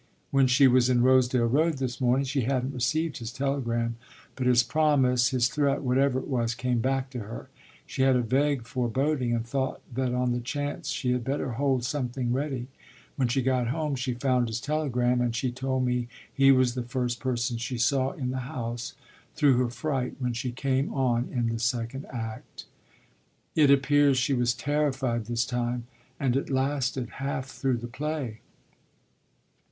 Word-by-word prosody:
When 135 -1 +4
she 130 +2 +6
was 125 0 +4
in 120 -1 +3
Rosedale 130 -1 +4
Road 155 +7 +2
this 130 0 -3
morning 130 +2 +2
she 135 +1 0
hadn't 130 +2 -1
received 155 +6 0
his 115 0 -5
telegram; 120 -4 -1 0.4
but 130 -2 -1
his 120 -1 +5
promise, 130 -3 +3
his 125 -2 +2
threat, 140 +1 0
whatever 130 +1 +2
it 130 - -4
was, 120 -3 0
came 125 0 0
back 130 +2 -1
to 125 - -5
her: 110 +1 -8 0.4
she - - -4
had 130 -1 +4
a 125 - +2
vague 135 +2 +1
foreboding 125 +2 -1
and 115 -1 -1
thought 130 +2 -2
that 130 0 -1
on 125 0 0
the 120 - 0
chance 145 +4 -4
she 125 -3 -1
had 125 -1 0
better 135 0 -2
hold 130 +1 0
something 125 -3 -2
ready. 135 -2 -2 0.5
When 130 -3 +1
she 130 +2 0
got 125 -2 +1
home 150 +3 -1
she 125 -1 -2
found 125 -1 +1
his 115 0 -3
telegram, 125 -4 0
and 120 -1 0
she 125 +2 -1
told 130 +1 -1
me 125 -1 0 0.3
he 135 -1 +5
was 130 -2 +3
the 125 - -3
first 120 0 -2
person 120 -2 -1
she 125 +1 -3
saw 130 +3 +1
in 125 -3 -3
the 130 - -3
house, 120 -5 -5 0.4
through 140 -4 +4
her 125 -1 +1
fright 130 0 -2
when 125 -2 -2
she 120 +2 -3
came 135 +2 -1
on 125 -3 0
in 120 -3 0
the 115 0 -2
second 120 +2 -2
act. 115 -3 -7 0.9
It 150 -3 +5
appears 140 0 +4
she 135 +3 +1
was 120 -1 +1
terrified 135 -5 -1
this 120 +1 0
time, 120 -1 -2 0.3
and 130 -3 +1
it 135 - -1
lasted 130 -2 0
half 135 -1 -2
through 130 -2 -1
the 120 - -6
play." 130 -3 -4
130 Hz, 180 wpm, -27 LUFS, 120-135 Hz, 0.9 s, she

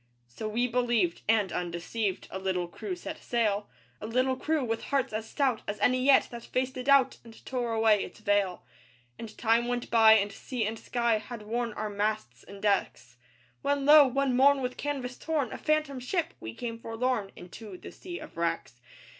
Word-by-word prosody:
So 120 - -6
we 240 +3 +1
believed. 235 -8 +1
And, 210 -4 +3
undeceived, 180 +4 -3
A 190 - -4
little 185 -2 -1
crew 365 - -5
set 320 -3 -7
sail; 210 -4 0 0.3
A 215 - -5
little 255 +3 +1
crew 305 +1 -1
with 225 -1 -3
hearts 275 -5 0
as 220 +1 -4
stout 265 -6 0
As 205 - -4
any 255 0 +2
yet 275 0 +5
that 235 -1 -7
faced 260 +1 -2
a 255 - -4
doubt 275 -1 +4
And 230 -1 -15
tore 245 -3 -2
away 220 -2 +3
its - - -10
veil. 205 -4 0 0.6
And 220 -2 -9
time 230 +1 +2
went 245 0 -3
by; 225 -1 +8
and 205 -1 +2
sea 245 -1 -3
and 220 +1 -3
sky 235 -3 0
Had 215 0 -9
worn 235 +2 -2
our 210 0 -4
masts 205 - -2
and 200 +1 -12
decks; 125 - -1 0.4
When, 285 -1 0
lo! 295 -1 +9
one 265 0 0
morn 275 +1 +5
with 250 0 -2
canvas 265 -4 -4
torn, 300 -7 -1
A - - -5
phantom 305 -3 0
ship, 315 +7 -2
we 110 0 -7
came 230 - -5
forlorn 225 -3 -2
Into 185 +2 -10
the - - -10
Sea 355 -1 -8
of 310 - -11
Wrecks. 165 -7 -2
230 Hz, 190 wpm, -29 LUFS, 205-260 Hz, 0.6 s, lo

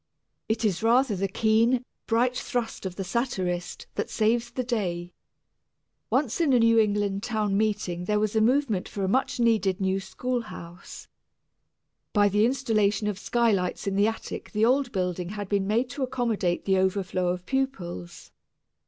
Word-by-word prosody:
It 220 +1 0
is 190 -4 0
rather 235 0 +3
the 195 +1 -1
keen, 225 +5 +2 0.2
bright 245 +2 +2
thrust 235 -6 -3
of 180 - -8
the 195 - -3
satirist 185 -5 -2
that - - -3
saves 230 +2 +1
the 255 - -3
day. 180 -8 -2 1.0
Once 270 +2 +1
in 295 -5 +3
a 245 - +5
New 230 0 +5
England 205 -2 +1
town 215 -3 -1
meeting 200 -4 -1
there 210 +2 +1
was 215 0 -1
a 220 - +4
movement 235 -4 +1
for 200 - -4
a - - +1
much 260 +5 0
needed 215 -5 +2
new 190 0 +1
schoolhouse. 195 -4 -6 1.1
By 205 -1 +4
the 210 +3 +3
installation 225 -5 +1
of 205 -2 -2
skylights 215 -7 0
in 200 -1 -1
the 200 +2 +4
attic 225 - -5
the 215 +1 +3
old 260 +1 +2
building 180 -2 -2
had 205 -1 -5
been 195 -1 0
made 230 +5 +1
to 280 - -6
accommodate 235 -9 -1
the 190 -1 +3
overflow 185 -1 0
of 180 0 -2
pupils. 190 - -4
215 Hz, 160 wpm, -26 LUFS, 190-240 Hz, 1.1 s, a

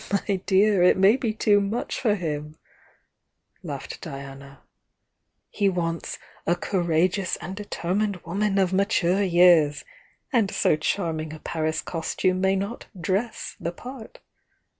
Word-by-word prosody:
"But, 200 0 -1
my 200 -2 +1
dear, 200 0 +4
it 180 - +5
may 195 +4 +6
be 245 -4 -1
too 210 -1 +3
much 205 +4 -2
for 215 -5 +2
him!" 150 -4 -4 1.0
laughed - - -7
Diana. 140 0 -9 0.9
"He 200 -2 +2
wants 170 -2 -3 0.3
'a 175 - +3
courageous 175 +1 0
and 180 +4 -7
deter 195 -4 -4
mined 205 0 +1
woman 200 +3 0
of 190 -1 +2
mature 195 -1 +2
years,' 175 -5 +4 0.2
— - - -36
and 225 -5 +3
so - - +2
charming 155 -1 -2
a 155 - -9
Paris 155 0 -2
costume 185 +2 -1
may 190 0 +3
not 200 +5 -4
'dress' 195 +7 -2
the 170 - -3
part!" 245 +5 -10
185 Hz, 140 wpm, -25 LUFS, 165-200 Hz, 1.0 s, may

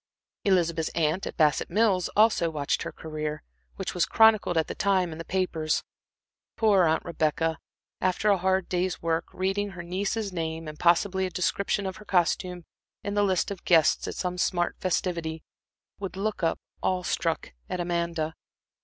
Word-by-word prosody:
Elizabeth's 170 -4 +2
aunt 165 +3 +1
at - - -7
Bassett 150 -3 +3
Mills 195 -2 +2
also 210 -6 +4
watched 145 -3 -1
her - - -4
career, 155 -1 -5 0.3
which 195 - -4
was 180 - +1
chronicled 220 -6 +4
at 160 - +3
that - - -7
time 190 -4 +2
in 160 - -8
the - - -4
papers. 165 -4 0 0.7
Poor 205 -5 +4
Aunt 160 0 +1
Rebecca, 160 -1 0 0.4
after 185 +3 +2
a 200 - +4
hard 190 0 +1
day's 180 0 -1
work, 165 0 0
reading 195 +2 -1
her 180 -3 -8
niece's 195 +3 -2
name, 165 -1 -3
and 155 0 -8
possibly 185 +2 +3
a - - -5
description 195 +3 0
of 190 0 -4
her 210 - -13
costume 180 -1 0 0.4
in 200 - -3
the 205 - +2
list 190 -1 +1
of 195 - -6
guests 165 -3 +4
at - - -4
some 180 -1 -3
smart 175 -1 +1
festivity, 170 -3 -1 0.6
would 195 -1 -5
look 210 +1 -2
up, 165 -1 +1 0.2
awe 185 -1 0
struck, 165 - -1 0.2
at 180 - -3
Amanda. 170 -2 -1
180 Hz, 170 wpm, -27 LUFS, 165-190 Hz, 0.7 s, also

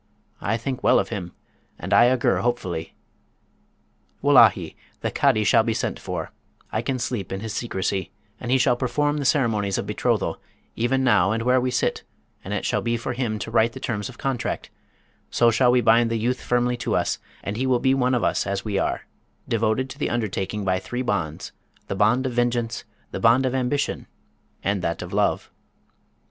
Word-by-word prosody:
I 115 +3 0
think 130 +2 -4
well - - +5
of - - 0
him, 95 -6 -5 0.5
and - - -3
I 120 +1 +7
augur 130 -2 +2
hopefully. 90 -9 -2 1.3
Wullahy! - - +5 0.3
the - - -1
Cadi 110 - +2
shall 105 - +5
be 110 0 -1
sent - - -2
for; - - -5 0.4
I 110 - 0
can 130 +2 -2
sleep 115 -5 -3
in 95 - -3
his 110 -1 -5
secresy; 95 -4 -2 0.3
and 120 - -6
he 130 - +4
shall 125 -1 +3
perform 145 +4 0
the 145 - -2
ceremonies 110 -8 +1
of - - -2
betrothal, - - -1 0.3
even 130 +3 +1
now 100 -7 +4
and 115 +1 -1
where 125 +1 +3
we 125 - 0
sit, 125 - 0 0.4
and - - -7
it - - -2
shall - - 0
be 115 0 0
for 120 - -4
him 120 -4 -2
to 110 - -6
write 115 0 +3
the 130 - -8
terms 110 -2 -3
of 130 - -12
contract: 135 -3 -3 0.6
so 120 -1 +4
shall 125 +2 +3
we 125 0 +4
bind 115 +1 +4
the 115 - 0
youth 120 +3 -1
firmly 125 0 +1
to - - -1
us, - - 0 0.2
and 100 - -3
he 130 +4 -1
will 130 -1 +3
be 130 +1 +3
one 130 -1 +2
of 120 - 0
us - - +1
as 100 +1 -2
we 100 -2 0
are, - - -2 0.4
devoted 115 +3 +1
to 135 - -10
the - - 0
undertaking 105 -3 -2
by 95 -1 +1
three 125 +6 -4
bonds 90 -10 -2 0.3
the - - -4
bond 110 +6 +3
of 130 - -1
vengeance, 120 -1 -1 0.3
the - - -4
bond 120 +3 +4
of 130 - 0
ambition, 130 +2 -1 0.6
and 100 -1 0
that 85 -1 -2
of - - -9
love.' - - 0
120 Hz, 195 wpm, -24 LUFS, 105-125 Hz, 1.3 s, I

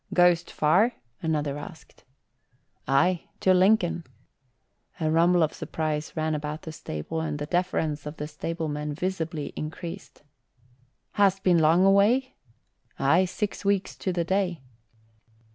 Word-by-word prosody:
"Goest 175 -1 +4
far?" 185 +11 +3 0.3
another 150 -3 -1
asked. 160 +2 -12 0.8
"Aye, 170 +6 +2
to 185 - +4
Lincoln." 185 -2 +3 1.0
A 155 -1 0
rumble 170 +1 +4
of 155 - 0
surprise 155 -1 -3
ran 155 0 0
about 150 +1 -4
the 160 - -6
stable 155 - -5
and 155 -2 -3
the 145 - -4
deference 160 -3 -1
of 150 +1 -7
the 150 - -4
stablemen 150 -1 -4
visibly 165 -4 -3
increased. 160 +1 -7 0.9
"Hast 195 -2 +2
been 175 -2 +4
long 165 +4 +4
away?" 215 +7 +4 0.6
"Aye, 160 +7 +3
six 205 +3 -4
weeks 200 -1 0
to 190 - -2
the 175 -1 0
day." 180 -5 -1
165 Hz, 125 wpm, -26 LUFS, 150-185 Hz, 1.0 s, Goest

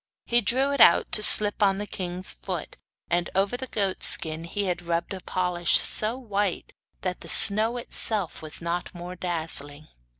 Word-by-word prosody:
He 240 0 +1
drew 260 +6 0
it 280 -4 -1
out - - +4
to 215 - +3
slip 210 0 +5
on 195 -2 +2
the 205 - -5
king's 185 -2 -4
foot, - - -8 0.4
and 175 0 -1
over 195 +4 0
the 260 +1 -7
goat 200 -5 -3
skin 160 +1 +3
he 205 +4 -4
had 180 -2 -3
rubbed 170 +2 -4
a 190 - -7
polish 180 -2 0
so 220 +3 +2
white 205 -7 -4 0.3
that 180 -1 -5
the - - -10
snow 220 +4 +4
itself 215 -5 -3
was 155 +1 -4
not 175 +2 -5
more 175 +1 -9
dazzling. 155 -4 -1
190 Hz, 175 wpm, -24 LUFS, 175-215 Hz, 0.4 s, slip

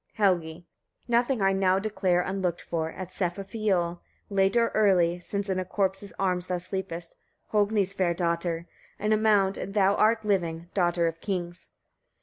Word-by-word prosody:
Helgi. 175 -5 +1 0.4
46. - - -32
Nothing 240 0 +2
I 195 0 +4
now 190 -1 +3
declare 195 -3 +1
unlooked 185 -2 -2
for, 160 -1 -2
at 185 +2 -7
Sefafioll, 185 -1 -1 0.3
late 195 +3 +3
or 230 0 +3
early, 180 -5 +3
since 200 +3 -4
in 190 -1 0
a - - -1
corpse's 195 +1 -2
arms 180 -2 0
thou 180 - -1
sleepest, 175 -2 -5 0.4
Hogni's 205 -2 +2
fair 180 -3 +1
daughter! 170 -1 -1 0.3
in 210 +1 +1
a - - +4
mound, 205 -3 +3
and 195 - -6
thou 200 -1 +4
art 220 +1 +2
living, 170 -4 -1
daughter 175 -2 +2
of 165 0 -2
kings! 175 -3 -4
190 Hz, 160 wpm, -27 LUFS, 175-200 Hz, 0.4 s, I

